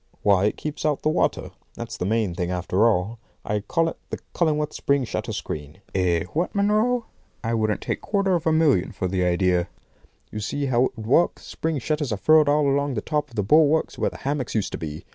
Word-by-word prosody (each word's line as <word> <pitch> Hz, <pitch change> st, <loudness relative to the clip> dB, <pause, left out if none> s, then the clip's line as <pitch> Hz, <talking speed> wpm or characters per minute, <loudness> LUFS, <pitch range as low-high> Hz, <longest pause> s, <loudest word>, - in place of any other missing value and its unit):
Why 100 Hz, -1 st, +4 dB
it 105 Hz, -, 0 dB
keeps 150 Hz, -1 st, -5 dB
out 150 Hz, -2 st, 0 dB
the 155 Hz, -, +3 dB
water. 155 Hz, -, 0 dB, 0.2 s
That's -, -, -6 dB
the 90 Hz, -, -3 dB
main 110 Hz, -4 st, +1 dB
thing, 90 Hz, 0 st, -2 dB
after 90 Hz, +4 st, +2 dB
all. 110 Hz, +2 st, 0 dB, 0.3 s
I 105 Hz, 0 st, 0 dB
call 165 Hz, -, 0 dB
it -, -, -5 dB
the -, -, -4 dB, 0.2 s
Cullingworth 150 Hz, -3 st, 0 dB
spring 140 Hz, -1 st, +1 dB
shutter 120 Hz, -, -4 dB
screen. 75 Hz, +3 st, -6 dB
Eh, 90 Hz, -3 st, +1 dB
what, 170 Hz, +6 st, -1 dB
Munro? 215 Hz, +4 st, +2 dB, 0.4 s
I 115 Hz, 0 st, -1 dB
wouldn't 110 Hz, -3 st, 0 dB
take -, -, -2 dB
a -, -, -35 dB
quarter 200 Hz, -2 st, +1 dB
of 170 Hz, -2 st, 0 dB
a -, -, +4 dB
million 150 Hz, -, +2 dB
for 95 Hz, -, -2 dB
the 90 Hz, 0 st, 0 dB
idea. 90 Hz, 0 st, +1 dB, 0.6 s
You 105 Hz, -, -5 dB
see 140 Hz, +7 st, -2 dB
how 130 Hz, -1 st, +3 dB
it -, -, -5 dB
would 110 Hz, -, -7 dB
work. 150 Hz, +9 st, +3 dB
Spring 160 Hz, -1 st, -3 dB
shutters 150 Hz, 0 st, -2 dB
are 105 Hz, -, -1 dB
furled 155 Hz, +6 st, +5 dB
all 145 Hz, 0 st, +3 dB
along 140 Hz, -1 st, +1 dB
the 105 Hz, -, -1 dB
top 150 Hz, +1 st, -2 dB
of 120 Hz, -, -16 dB
the 105 Hz, -, 0 dB
bulwarks 155 Hz, +7 st, +3 dB
where -, -, +1 dB
the -, -, -11 dB
hammocks 135 Hz, -4 st, -3 dB
used 110 Hz, -, 0 dB
to -, -, -5 dB
be. 75 Hz, -1 st, -6 dB
130 Hz, 225 wpm, -24 LUFS, 95-155 Hz, 0.6 s, furled